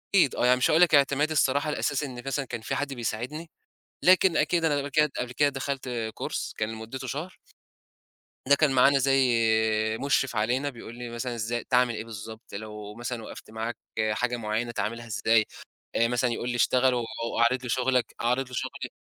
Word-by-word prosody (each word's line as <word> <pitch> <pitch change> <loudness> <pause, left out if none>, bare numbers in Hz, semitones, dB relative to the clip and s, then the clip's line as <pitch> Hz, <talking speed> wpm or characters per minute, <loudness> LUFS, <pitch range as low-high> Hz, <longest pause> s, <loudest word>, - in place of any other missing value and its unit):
أكيد 175 -9 +4
آه، - - +1
يعني 125 +1 +5
مش 125 - +2
هاقول 160 +3 +4
لك 175 -3 +6
اعتمادي 145 +2 +3
الصراحة 145 0 +2
الأساسي 145 -1 -1
إن 125 -2 -7
مثلًا 135 +1 -1
كان 115 - -6
في 135 - -3
حد 140 0 -2
بيساعدني، 125 +7 -4 0.5
لكن 185 -1 +5
أكيد 165 +2 +2
أنا 150 -3 +2
قبل 140 0 -3
كده 150 +1 +3
قبل 125 0 -3
كده 145 +3 +3
دخلت 135 -1 -4 0.3
كورس - - -4
كان 110 +1 -2
مدته 115 +4 -7
شهر 155 +8 -5 1.1
ده 140 - +7
كان 150 -1 +3
معانا 135 +2 +5
زي 135 -2 +3 0.7
مُشرف 135 -3 +1
علينا، 125 +6 +1
بيقول 120 -3 -10
لي 120 0 -7
مثلًا 120 +1 -4
إزاي 115 +1 -2
تعمل 125 -2 +2
إيه 110 - -5
بالضبط، 110 +1 -10
لو 105 0 -7
مثلًا 120 -1 -5
وقفت 110 - -10
معاك 110 +1 -4 0.3
حاجة 120 +2 -1
معيّنة 110 +2 -2
تعملها 115 +1 -3
إزاي، 110 +1 +2 0.5
آآ 115 - +3
مثلًا 125 +1 +1
يقول 120 +1 -3
لي 120 - -2
اشتغل 125 +1 +3
و - - 0 0.4
وأعرض 125 +2 +2
لي 125 - -5
شُغّلك، 130 0 +1
أعرض 125 +3 +1
له 125 - -13
شغلي. - - -4
125 Hz, 190 wpm, -27 LUFS, 115-140 Hz, 1.1 s, ده